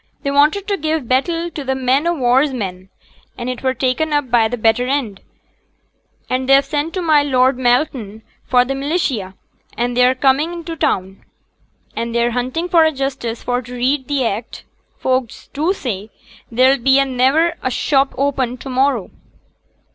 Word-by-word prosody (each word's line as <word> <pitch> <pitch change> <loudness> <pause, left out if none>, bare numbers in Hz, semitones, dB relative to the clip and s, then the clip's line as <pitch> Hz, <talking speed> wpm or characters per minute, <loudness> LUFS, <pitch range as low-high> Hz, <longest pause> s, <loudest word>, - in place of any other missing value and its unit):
They 280 - -1
wanted 305 +8 +2
to 400 -1 0
give 310 -5 -2
battle 330 +7 0
to 295 - -6
t' 265 0 -1
men 265 +4 +1
o' 345 - +2
war's 265 +1 +2
men; 190 -6 -5 0.5
and 245 +1 -3
it 250 - -7
were 260 0 0
taken 265 +5 0
up 290 -4 0
by 230 -2 +4
th' 245 0 -4
better 225 +3 +2
end, 255 -8 -2 1.1
and 255 +1 -2
they've 275 0 +6
sent 295 +4 -3
to 370 - -2
my 310 -3 +4
Lord 260 -2 +2
Malton 240 -4 0 0.2
for 250 -1 +4
t' 270 - -2
militia; 270 - -2 0.4
and 240 +1 -1
they're 250 +1 +4
come 265 +1 +3
into 335 +1 -4
t' - - -24
town, 190 +1 -1 0.7
and 235 0 -3
they're 235 0 +2
hunting 255 +8 -2
for 340 -2 +4
a 315 - +3
justice 265 -5 -4
for 245 0 -1
t' 250 0 -11
read 260 +2 0
th' 285 -2 0
act; 225 +1 -4 0.3
folk 255 -2 0 0.2
do 310 +6 0
say 220 - -4 0.4
there'll 260 +3 +4
be 265 +3 +4
niver 270 +6 +2
a 255 - -1
shop 270 +2 +1
opened 260 -3 -1
to 270 - -7
morrow.' 255 -5 0
260 Hz, 175 wpm, -18 LUFS, 245-290 Hz, 1.1 s, they've